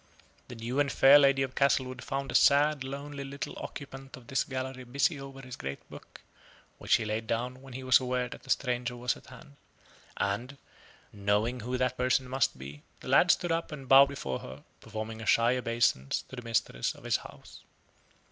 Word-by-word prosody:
The 125 - -9
new 120 +4 -3
and 140 -1 +2
fair 140 +2 +7
lady 135 -1 +4
of 130 -1 -4
Castlewood 130 -1 +1
found 135 0 -3
the - - -6
sad, 145 0 +4
lonely, 140 +1 -6
little 140 +1 -6
occupant 135 -1 -8
of 125 - -15
this 135 - 0
gallery 130 -1 -5
busy 140 +4 0
over 135 0 -10
his 130 -1 -8
great 70 +1 -7
book, - - -12 0.6
which - - +3
he - - -1
laid 110 +1 -3
down 125 +3 -2
when 135 -2 -12
he 130 +1 -6
was 130 -1 +6
aware 125 -1 -1
that - - -11
a - - -14
stranger 125 -1 -1
was 120 0 0
at - - -16
hand. 130 +3 -14 0.6
And, 120 +8 -2 0.6
knowing 105 +4 0
who 125 +3 -3
that 125 0 0
person 130 +1 +1
must 130 - 0
be, 70 +3 -10 0.2
the - - -8
lad - - +5
stood 175 -2 +3
up 165 0 -1
and 140 -3 -8
bowed 135 +1 +8
before 70 - -4
her, 65 +3 -10 0.2
performing 110 +1 -6
a 110 - -7
shy 120 +2 +4
obeisance 115 - 0
to - - -8
the 120 - -7
mistress 115 - -1
of - - -16
his - - +1
house. - - -13
130 Hz, 195 wpm, -29 LUFS, 115-135 Hz, 0.6 s, bowed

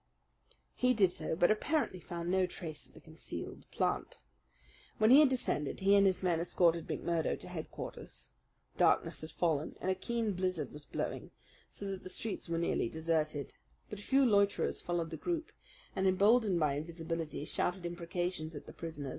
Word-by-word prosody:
He 250 0 +2
did 190 -5 +4
so; 160 0 -2
but 175 +4 +4
apparently 250 - 0
found 170 0 -4
no 185 -1 +3
trace 155 -7 -7
of - - -24
the - - -11
concealed 160 -1 -8
plant. - - -1 0.8
When 215 +2 +5
he 270 - +10
had 300 -3 +7
descended 220 - -1
he 195 +1 +5
and 200 -1 +6
his 190 0 +1
men 175 -3 +2
escorted 170 -1 +2
McMurdo 170 -2 -1
to - - -9
headquarters. - - -7 0.5
Darkness - - +3
had 155 - -6
fallen, 155 -4 0
and 190 - 0
a - - +3
keen 225 +2 -1
blizzard 185 0 -1
was 150 0 -9
blowing - - -4 0.4
so 200 - -7
that 195 -1 -4
the - - -8
streets 200 -1 -3
were 165 - 0
nearly 165 -8 0
deserted; 155 -2 -1 0.4
but 210 - -5
a - - -8
few 270 +5 +3
loiterers 200 -3 +2
followed 170 -2 -2
the 160 - -4
group, 335 - -2 0.4
and 190 0 +2
emboldened 200 0 +4
by 150 -3 +2
invisibility 165 0 -4
shouted 180 +2 -1
imprecations 170 -2 -3
at 145 - -8
the - - -10
prisoner. 155 -4 -6
175 Hz, 175 wpm, -33 LUFS, 160-200 Hz, 0.8 s, he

